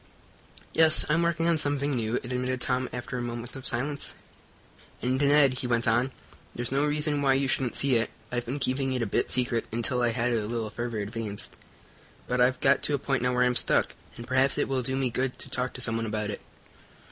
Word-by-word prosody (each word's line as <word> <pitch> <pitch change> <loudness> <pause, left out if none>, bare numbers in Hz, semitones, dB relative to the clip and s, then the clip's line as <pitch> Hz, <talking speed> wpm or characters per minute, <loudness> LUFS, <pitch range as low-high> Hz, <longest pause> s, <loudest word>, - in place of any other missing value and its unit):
"Yes, 160 -1 +6
I'm 165 +3 +2
working 170 -1 +1
on 165 -2 +3
something 145 0 +1
new," 115 -1 -1
admitted 125 +1 -2
Tom, 125 +1 -1
after 125 0 -5
a - - -3
moment 120 0 -6
of 130 - -5
silence. 140 +4 -2 0.8
"And, 130 +3 -1
Ned," 140 -2 +4
he 125 - -3
went 120 -1 0
on, 120 +4 +2 0.4
"there's 120 0 -3
no 140 +2 +1
reason 150 0 +1
why 135 -1 +3
you 135 0 +1
shouldn't 130 -1 0
see 135 -3 +4
it. 115 - -1 0.2
I've 120 -1 -3
been 130 +4 -3
keeping 135 0 0
it 125 -2 -1
a - - 0
bit 100 - -1
secret, 125 -2 0
until 120 +2 0
I 120 - +3
had 120 +1 -1
it 115 -2 +1
a 105 - -5
little 115 -2 -3
further 120 +1 -4
advanced, 105 0 -5 0.7
but 125 0 0
I've 125 +1 +3
got 135 +1 +4
to 145 - 0
a - - 0
point 135 -2 -1
now 125 0 +1
where 125 - +3
I'm 125 0 +2
stuck, - - +2 0.2
and 120 - -8
perhaps 130 +2 +2
it - - +1
will 135 -1 0
do 130 +2 -1
me 135 -2 -1
good 130 +1 -2
to - - -8
talk 125 0 -1
to 130 - -3
someone 115 -1 +2
about 105 -1 -2
it." - - -7
125 Hz, 225 wpm, -27 LUFS, 120-135 Hz, 0.8 s, Yes